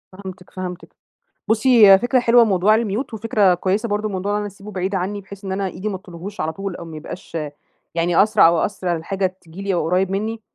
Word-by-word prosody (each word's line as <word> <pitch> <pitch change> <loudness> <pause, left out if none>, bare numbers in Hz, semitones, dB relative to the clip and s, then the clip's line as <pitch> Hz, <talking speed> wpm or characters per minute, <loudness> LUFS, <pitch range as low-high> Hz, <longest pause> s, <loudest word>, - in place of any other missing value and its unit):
فهمتك، 190 -1 -10
فهمتك. 180 -1 -7 0.5
بصي 220 0 +5
هي 195 -1 +8
فكرة 245 +3 +2
حلوة 240 0 +5
موضوع 210 0 +3
الmute 225 +3 -2
وفكرة 210 -3 +2
كويسة 195 +6 -1
برضو 210 +1 -1
موضوع 195 +1 -3
إن 210 - +1
أنا 210 - -3
أسيبه 200 +1 -11
بعيد 190 0 -2
عني، 195 +2 -2
بحيث 200 +1 -12
إن 190 - -4
أنا 195 +1 -1
إيدي 195 +3 -5
ما 195 - -4
تطولهوش 185 +1 -8
على 160 +1 -2
طول، 195 +1 -5
أو 170 - -8
ما 160 -2 -9
يبقاش 165 +2 -8 0.6
يعني 170 +2 +3
أسرع 215 -4 +5
أو 170 0 +3
أثر 190 -1 -3
على 175 - +1
الحاجة 190 +1 -2
تيجي 170 +3 -11
لي 200 -1 -1
أو 170 - 0
قريب 185 +2 +1
مني، 220 +3 -3
195 Hz, 220 wpm, -20 LUFS, 180-210 Hz, 0.6 s, هي